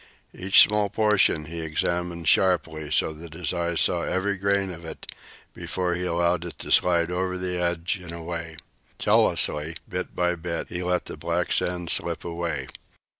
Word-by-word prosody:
Each 95 +1 +5
small 105 -1 +1
portion 105 -7 +2
he 85 +2 -7
examined 85 +1 -2
sharply, 80 -5 +2
so 80 +1 +2
that 80 0 -10
his 85 -2 -2
eyes 85 -1 0
saw 85 - +2
every 95 +3 -1
grain 100 0 0
of 85 -1 -9
it 80 - -8 0.5
before 90 -1 -2
he 90 +1 -2
allowed 85 0 +1
it 85 - -8
to - - -7
slide 85 -1 +4
over 90 +1 -1
the 90 -1 -2
edge 85 +2 -1
and 90 -2 -9
away. 85 -1 -6 0.4
Jealously, 75 +2 +2
bit - - -5
by 90 0 +1
bit, 85 -1 -4
he 85 - -4
let 90 0 0
the - - -8
black 85 +3 -2
sand 90 -1 0
slip - - 0
away. 85 -5 -3
85 Hz, 170 wpm, -25 LUFS, 85-90 Hz, 0.5 s, Each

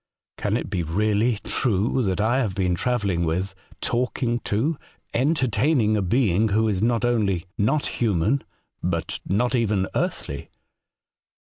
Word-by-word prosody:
' - - -69
Can - - 0
it - - -4
be 90 - -2
really 105 +7 +1
true 115 +2 +1
that 95 -4 0
I 115 +5 +2
have 105 -8 -1
been 90 -2 +1
travelling 100 -3 0
with, 90 +4 -1 0.3
talking 120 0 0
to, 130 +11 +1 0.4
entertaining 130 -3 +2
a 105 - +1
being 105 0 +2
who 110 +2 +2
is 100 -3 0
not 115 +1 +2
only 105 -8 +1
not 125 +9 +1
human, 110 +4 +1 0.4
but 85 -2 -2
not 120 +7 +1
even 105 -6 +1
earthly.' 70 0 -3
110 Hz, 140 wpm, -24 LUFS, 95-120 Hz, 0.4 s, I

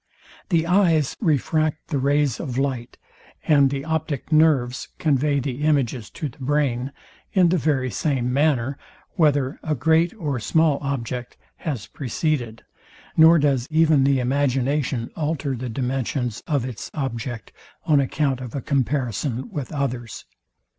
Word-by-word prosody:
The 165 -3 +2
eyes 170 -6 +3
refract 155 - 0
the 145 - 0
rays 140 -1 +1
of 125 -2 -4
light, 130 -3 -2 0.5
and 140 -3 +5
the 140 +1 -4
optic 160 -3 -3
nerves 145 -6 +3
convey 145 -2 +1
the 135 0 -4
images 135 -7 0
to 155 - -5
the 130 - -13
brain 135 -2 0 0.4
in 185 -3 +5
the 180 0 +2
very 135 -4 0
same 125 - -1
manner, 140 -2 +1 0.3
whether 145 -4 +1
a 155 -1 -1
great 160 +6 +3
or 150 - -2
small 155 +5 +2
object 125 -3 -4 0.2
has 135 -10 -4
preceded; 125 -3 -3 0.5
nor 165 +1 +7
does 140 -4 +1
even 155 -3 +4
the 135 -1 +3
imagination 135 -1 0
alter 150 -3 -2
the 125 +1 -5
dimensions 125 -1 -2
of 145 -7 0
its 125 -4 -6
object 125 -4 -4 0.3
on 150 -3 +4
account 135 -1 0
of 125 -1 -7
a 140 - -2
comparison 130 -2 -1
with 140 -4 -5
others. 125 -6 -4
140 Hz, 140 wpm, -23 LUFS, 125-155 Hz, 0.5 s, nor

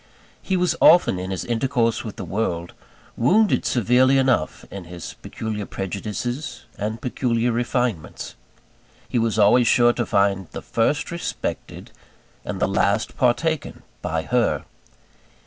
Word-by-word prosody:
He 190 - -1
was 180 -2 +1
often, 170 - +6
in 95 +1 -5
his 95 -2 -3
intercourse 120 -1 0
with 110 - -7
the 100 - -6
world, 85 -3 -2 0.4
wounded 205 - +3
severely 125 +3 +3
enough 130 -11 +1
in 100 -3 -7
his 85 0 -8
peculiar 110 -2 -5
prejudices 110 - -4
and 110 +2 -3
peculiar 120 -1 0
refinements 120 -6 -2 0.7
he 120 - 0
was 115 -1 0
always 115 +3 +5
sure 120 0 +5
to 120 - -1
find 100 -2 +1
the - - -6
first 145 +9 0
respected, 170 +1 -5 0.5
and - - -5
the - - +2
last - - +1
partaken 155 +5 0 0.2
by 80 0 -2
_her. 120 +1 +1
115 Hz, 130 wpm, -23 LUFS, 100-125 Hz, 0.7 s, often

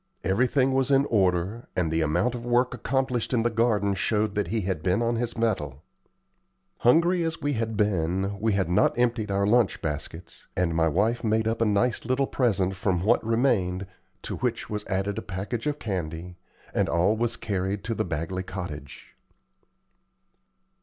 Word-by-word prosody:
Everything 125 - +2
was 135 0 +1
in 140 0 +4
order, 95 +2 +1
and 85 -3 0
the 80 0 +1
amount 85 +11 +1
of 120 -1 -6
work 120 +1 +2
accomplished 125 0 -1
in 115 - +2
the 120 - +1
garden 105 -3 +2
showed 105 +2 0
that 105 -3 -1
he 110 +5 -1
had 95 -4 -2
been 90 +4 +1
on 120 0 +1
his 120 0 -3
mettle. 75 - -1 1.0
Hungry 170 +8 +4
as 165 0 -2
we 145 -1 -1
had 110 -3 -2
been, 95 -1 0
we 110 0 +1
had 100 -2 +1
not 95 +7 +2
emptied 120 -3 +1
our 100 0 +1
lunch 115 0 +3
baskets, 80 +3 -6
and 90 -2 +1
my 80 0 +2
wife 105 +10 +1
made 110 0 +1
up 115 0 -1
a - - +4
nice 105 +3 +1
little 130 +2 +1
present 100 -9 0
from 90 -1 0
what 115 +4 +3
remained, 110 -6 +1 0.4
to - - -4
which - - -2
was 105 0 -4
added 95 +1 -1
a - - -6
package 105 +8 -4
of 150 0 -1
candy, 90 - -4 0.4
and - - +1
all 90 +6 +2
was 115 +1 0
carried 95 -2 -2
to 115 - -2
the - - -1
Bagley 85 +3 -3
cottage. 90 -7 -8
105 Hz, 175 wpm, -26 LUFS, 90-120 Hz, 1.0 s, in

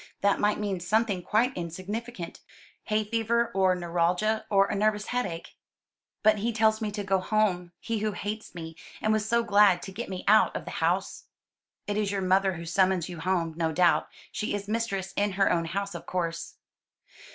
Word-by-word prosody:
That 200 0 +3
might 210 0 +2
mean 200 -3 -2
something 205 +1 +1
quite 235 +8 +1
insignificant 185 +3 -5 0.5
hay 215 0 +1
fever 230 +2 0
or 190 -1 +3
neuralgia, 180 +6 0
or 195 -1 +5
a - - -3
nervous 210 0 +1
headache." 195 -10 -3 0.7
"But 215 -1 +5
he 230 +3 0
tells 220 0 +2
me 215 - -1
to 205 0 -4
go 195 -1 +1
home 185 -3 0
he 230 -2 -2
who 215 0 -1
hates 210 -1 -5
me, 165 -1 -7 0.2
and 215 - +1
was 215 0 -1
so 235 0 +3
glad 205 -4 +4
to 195 - -7
get 215 +4 -6
me 185 -1 -5
out 215 +2 +5
of - - -4
the - - -6
house." - - 0 0.6
"It 205 0 -2
is 210 -2 0
your 195 -1 -1
mother 190 +1 +3
who 170 -1 -7
summons 185 0 +2
you 175 -2 -7
home, 170 -1 0
no 165 -1 0
doubt. 175 +2 +3 0.2
She 210 - -2
is 200 0 -5
mistress 200 -4 -2
in 205 -1 +1
her 195 +1 +3
own 170 -1 +1
house, 200 +4 -3
of 170 - -8
course." 170 -2 -3
200 Hz, 190 wpm, -28 LUFS, 180-215 Hz, 0.7 s, or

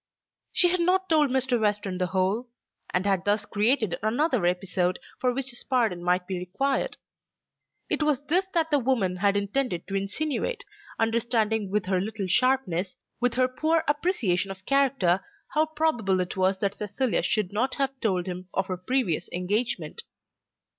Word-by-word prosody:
She 355 - +4
had 365 +1 +1
not 375 +2 +2
told 305 -3 +4
Mr. 260 -1 +1
Western 205 -3 0
the 180 - +1
whole, 190 +6 0 0.4
and 180 +2 0
had 195 -3 +1
thus 205 +1 +1
created 215 -2 +1
another 240 - +1
episode 180 0 0 0.2
for 250 - +2
which 265 +1 -1
his 240 - -3
pardon 225 -10 0
might 180 +1 +1
be 185 -1 -3
required. 265 +10 -1 0.9
It - - -1
was 295 -2 +1
this 365 +5 +3
that 325 -1 +1
the 290 - +4
woman 230 -8 0
had 200 +1 +2
intended 205 -2 -1
to 195 - -6
insinuate, 305 - -1 0.3
understanding 225 -2 +1
with 210 0 0
her 185 -1 +1
little 210 0 -3
sharpness, 200 -4 +1 0.2
with 245 0 +1
her 255 0 +3
poor 315 +5 +1
appreciation 285 - +1
of 190 -1 -9
character, 265 -10 +3 0.3
how 310 +1 +2
probable 300 -12 +1
it 180 -1 -2
was 190 0 +2
that 200 -1 +1
Cecilia 215 +5 -1
should 210 -3 0
not 250 +5 +1
have 270 -1 -2
told 185 -7 0
him 180 -1 -6
of 195 - +1
her 185 - -2
previous 190 -3 -1
engagement. 210 - -1
220 Hz, 165 wpm, -26 LUFS, 190-270 Hz, 0.9 s, She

